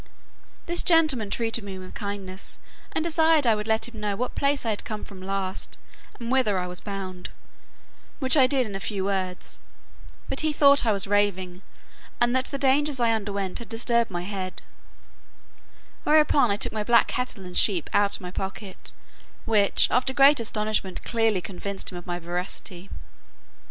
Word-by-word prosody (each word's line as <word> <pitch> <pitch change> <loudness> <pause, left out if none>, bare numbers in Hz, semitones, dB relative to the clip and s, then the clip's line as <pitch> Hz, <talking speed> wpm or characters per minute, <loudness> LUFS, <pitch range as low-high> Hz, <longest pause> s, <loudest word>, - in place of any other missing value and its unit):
This 345 +1 0
gentleman 310 - +3
treated 230 +1 -1
me 195 -2 -7
with 185 0 -10
kindness, 200 -2 -5 0.3
and 315 - -1
desired 320 -3 +3
I 230 - +5
would 210 0 -3
let 220 +1 +1
him 230 -3 -10
know 205 -1 -2
what 250 +4 -3
place 280 -2 0
I 220 -2 +1
came 210 +1 -6
from 195 -3 -10
last, 190 0 -3 0.4
and 235 0 -4
whither 255 -7 +2
I 180 - -1
was 180 0 -6
bound; 190 -3 -6 0.9
which 260 -1 +3
I 265 -4 +6
did 265 -2 +1
in 210 - -7
a 195 - -4
few 195 -1 -3
words, 190 -2 -2 0.7
but - - -2
he 310 -1 +1
thought 280 -3 +6
I - - +4
was 200 -2 +4
raving, 195 -3 0 0.6
and 240 +1 +3
that 260 0 +2
the 275 - -3
dangers 275 +1 +2
I 235 -1 +3
underwent 200 -3 -3
had 235 - -9
disturbed 235 0 +1
my 175 -2 -4
head; 185 -1 -5 1.4
whereupon 300 -4 +4
I 200 - +1
took - - -1
my 215 -1 -2
black 235 +2 +5
cattle 250 -6 -4
and 180 - -9
sheep 185 -7 +3
out 205 -1 +4
of - - -7
my 180 -1 -7
pocket, 190 +1 -4 0.5
which, 210 -3 +4
after 255 +1 +2
great 280 0 +7
astonishment, 215 -4 -2
clearly 225 -5 +1
convinced 195 +3 -4
him 180 - -7
of 175 - -15
my 175 0 -2
veracity. 180 +2 -6
210 Hz, 175 wpm, -25 LUFS, 190-250 Hz, 1.4 s, great